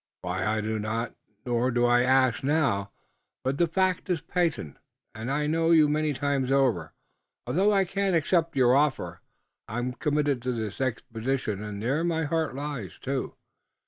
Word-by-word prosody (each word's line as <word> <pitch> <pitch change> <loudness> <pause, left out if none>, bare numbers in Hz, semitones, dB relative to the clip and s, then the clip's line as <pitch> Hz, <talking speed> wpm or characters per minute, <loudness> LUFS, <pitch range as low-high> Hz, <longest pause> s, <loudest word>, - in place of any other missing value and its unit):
Why, 90 +1 -2
I 105 +2 0
know 110 0 -2
not, 110 +2 -2 0.3
nor 120 0 +1
do 120 -1 +2
I 120 0 +4
ask 130 -1 +3
now, 135 -9 +1 0.5
but 135 +2 -1
the 170 - +4
fact 185 +3 0
is 175 -3 +1
patent, 160 - -2 0.4
and 110 +3 -5
I 150 +2 0
thank 165 +2 +3
you 155 -2 +6
many 150 +1 +1
times 140 -1 -1
over, 120 - +1 0.5
although 195 +5 +2
I 195 -2 +3
can't 195 0 0
accept 165 0 +1
your 125 -1 +5
offer. 130 - 0 0.5
I'm 120 +3 -3
committed 145 -2 0
to 125 +1 -1
this 110 0 -4
expedition 115 -3 -2
and 105 -1 -6
there 140 +7 +1
my 165 -2 0
heart 160 -2 -1
lies, 140 - -5
too. - - -3
135 Hz, 165 wpm, -27 LUFS, 115-155 Hz, 0.5 s, you